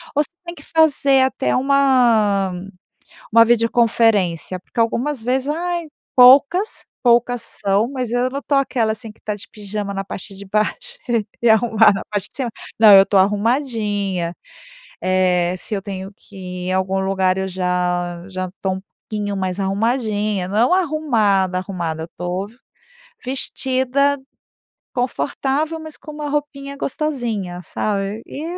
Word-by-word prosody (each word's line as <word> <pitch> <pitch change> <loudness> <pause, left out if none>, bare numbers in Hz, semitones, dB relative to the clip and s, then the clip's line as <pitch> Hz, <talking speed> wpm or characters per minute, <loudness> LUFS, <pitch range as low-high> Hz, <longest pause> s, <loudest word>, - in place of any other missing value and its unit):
ou 295 - +3
se - - -6
tem 345 0 -7
que 290 - -14
fazer 280 -4 +4
até 130 - 0
uma 240 -8 +3 0.8
uma 230 0 +8
videoconferência, 225 -6 +2
porque 230 - -8
algumas 240 +3 0
vezes 260 +3 0
Ai 340 +1 -2 0.3
Poucas, 280 - +5 0.2
poucas 240 0 +3
são, 205 0 0
mas 250 -4 -3
eu 245 +1 +1
não 275 +2 -4
estou 285 0 0
aquela 235 -5 0
assim 220 +1 -7
que - - -25
está 210 -1 -4
de 205 - -11
pijama 205 -1 -5
na 195 0 -3
parte 195 0 -8
de 200 - -10
baixo 350 - -2 0.4
e 235 - +3
arrumada 220 -1 +5
na 195 - -3
parte 205 -1 -2
de - - -21
cima. 250 -4 -2 0.3
Não, 220 -2 +8
eu 195 0 +9
estou 195 - +1
arrumadinha. 205 - 0 0.7
Eh, 180 -1 +2
se 210 +4 -2
eu 195 - -3
tenho 195 0 -6
que 205 - -19 0.3
ir - - -2
em 185 - 0
algum 190 +1 0
lugar 190 -1 +1
eu 190 0 -2
já 180 -1 -1
já 185 -1 -4
estou 190 +1 -3
um - - -10 0.3
pouquinho 205 -2 -2
mais 185 0 -2
arrumadinha, 210 -1 0
não 200 - -3
é 230 - +5
um - - +2
arrumada, 225 - +1
arrumada. 170 -4 -4
Eu - - -4
estou 180 +3 -4
v 230 - -20 0.7
vestida 265 +1 0 0.8
confortável, 280 +5 -1
mas 315 -1 -8
com 305 - -11
uma 295 0 -5
roupinha 280 -1 -4
gostosinha, 235 - -3
sabe, 205 +1 -3
e 295 - -7
220 Hz, 155 wpm, -20 LUFS, 195-265 Hz, 0.8 s, eu